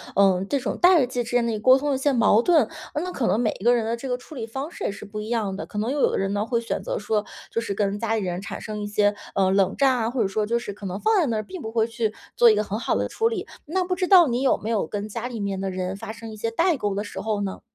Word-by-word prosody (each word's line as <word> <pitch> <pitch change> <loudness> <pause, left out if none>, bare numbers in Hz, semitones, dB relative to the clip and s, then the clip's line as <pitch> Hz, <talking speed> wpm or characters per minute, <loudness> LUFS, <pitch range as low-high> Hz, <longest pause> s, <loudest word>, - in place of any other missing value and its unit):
呃， 195 -1 +4
这 285 - +2
种 255 - -3
代 350 -7 +6
际 245 -1 -2
之 230 - -6
间 245 -1 +2
的 230 - 0
一 215 - -2
沟 255 +4 +6
通 290 +2 -2
的 275 - +2
一 - - -1
些 280 0 +2
矛 230 -1 +4
盾。 330 +2 +3 0.3
那 360 +4 -2
可 255 - -1
能 195 +4 +2
每 220 - +1
一 205 - -8
个 245 0 +6
人 230 - 0
的 230 +1 -1
这 270 - -6
个 250 -1 -1
处 295 +4 -13
理 230 -3 -5
方 270 +8 -5
式 - - -6
也 - - 0
是 200 - -10
不 210 +1 -7
一 210 - -5
样 220 -5 -1
的， - - -5
可 210 - -9
能 230 +5 -1
又 290 - -1
有 - - +4
的 - - -1
人 195 0 -1
呢 205 +1 0
会 235 -1 0
选 230 - -3
择 - - -3
说， 215 - -1 0.3
就 230 - 0
是 215 -3 -3
跟 200 0 -1
家 225 0 0
里 220 - 0
人 180 0 -2
产 200 0 -7
生 215 -1 -5
一 205 - -3
些， 205 0 +2 0.2
呃， 190 -1 +3
冷 195 0 +2
战 270 -2 +4
啊， 225 -1 0
或 245 -1 -1
者 195 - +1
说 210 +2 0
就 235 +3 +1
是 235 -4 -5
可 205 0 -10
能 185 0 -3
放 440 -1 +3
在 335 - +3
那 235 - -1
儿 215 - -1
并 370 -4 -8
不 220 +1 -6
会 225 -1 +3
去 230 -2 -2 0.2
做 240 - +7
一 215 - +5
个 210 - +1
很 210 +1 -4
好 - - 0
的 - - -1
处 450 - +1
理， 430 -4 -2 0.2
那 370 +5 0
不 365 0 -1
知 365 -1 -1
道 360 -5 +7
你 245 +2 0
有 270 - +3
没 215 - -6
有 215 -8 0
跟 205 0 -4
家 230 +3 -4
里 230 -4 -5
面 195 -1 -2
的 195 - -2
人 185 0 -3
发 220 +2 -7
生 225 0 -9
一 215 - -9
些 230 - -2
代 335 +5 +2
沟 205 -3 -1
的 205 - -1
时 205 - -7
候 215 -1 -1
呢？ 195 -1 -4
225 Hz, 365 characters per minute, -24 LUFS, 205-260 Hz, 0.3 s, 做